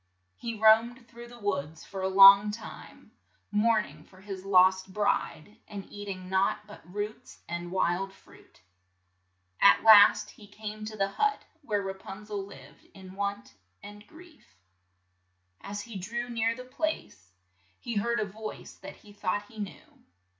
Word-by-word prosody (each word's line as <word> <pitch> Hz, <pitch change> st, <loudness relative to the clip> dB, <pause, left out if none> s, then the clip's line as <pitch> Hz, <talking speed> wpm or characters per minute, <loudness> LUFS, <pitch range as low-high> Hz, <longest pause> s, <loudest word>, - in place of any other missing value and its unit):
He 230 Hz, -, -6 dB
roamed 230 Hz, +3 st, +4 dB
through 235 Hz, 0 st, -12 dB
the 240 Hz, 0 st, -13 dB
woods 160 Hz, -8 st, -4 dB
for 195 Hz, -1 st, -7 dB
a 190 Hz, -, 0 dB
long 195 Hz, +2 st, +9 dB
time, 215 Hz, +1 st, -10 dB, 0.4 s
mourn 215 Hz, +1 st, +2 dB
ing -, -, -15 dB
for 185 Hz, -, -20 dB
his 190 Hz, -1 st, -8 dB
lost 190 Hz, 0 st, +4 dB
bride, 205 Hz, -1 st, -2 dB
and 200 Hz, -2 st, -8 dB
eat 205 Hz, 0 st, -8 dB
ing 185 Hz, -2 st, -6 dB
naught 190 Hz, +2 st, +1 dB
but 210 Hz, 0 st, -13 dB
roots 210 Hz, +2 st, -6 dB
and 175 Hz, 0 st, -5 dB
wild 190 Hz, +1 st, 0 dB
fruit. -, -, -21 dB, 1.0 s
At 100 Hz, -, +6 dB
last 210 Hz, -1 st, +7 dB
he 210 Hz, -, -16 dB
came 215 Hz, +1 st, -8 dB
to 215 Hz, 0 st, -7 dB
the 195 Hz, -1 st, +1 dB
hut 425 Hz, -, 0 dB, 0.2 s
where 210 Hz, -8 st, -2 dB
Ra 195 Hz, 0 st, -4 dB
pun 195 Hz, +2 st, -11 dB
zel 205 Hz, -2 st, -4 dB
lived 145 Hz, -7 st, -14 dB
in 190 Hz, -1 st, -12 dB
want 200 Hz, +1 st, -4 dB, 0.3 s
and 205 Hz, +1 st, -12 dB
grief. 320 Hz, -, -18 dB, 1.1 s
As 205 Hz, +1 st, -6 dB
he 230 Hz, -2 st, -8 dB
drew 240 Hz, +6 st, -5 dB
near 230 Hz, 0 st, 0 dB
the 255 Hz, +1 st, -10 dB
place, 255 Hz, -, -4 dB, 0.5 s
he 235 Hz, -3 st, -4 dB
heard 235 Hz, +3 st, 0 dB
a 215 Hz, -, 0 dB
voice 215 Hz, +2 st, -8 dB
that -, -, -11 dB
he 205 Hz, -, -17 dB
thought 205 Hz, 0 st, -2 dB
he 220 Hz, -, -12 dB
knew. 205 Hz, -3 st, -9 dB
205 Hz, 160 wpm, -28 LUFS, 195-220 Hz, 1.1 s, long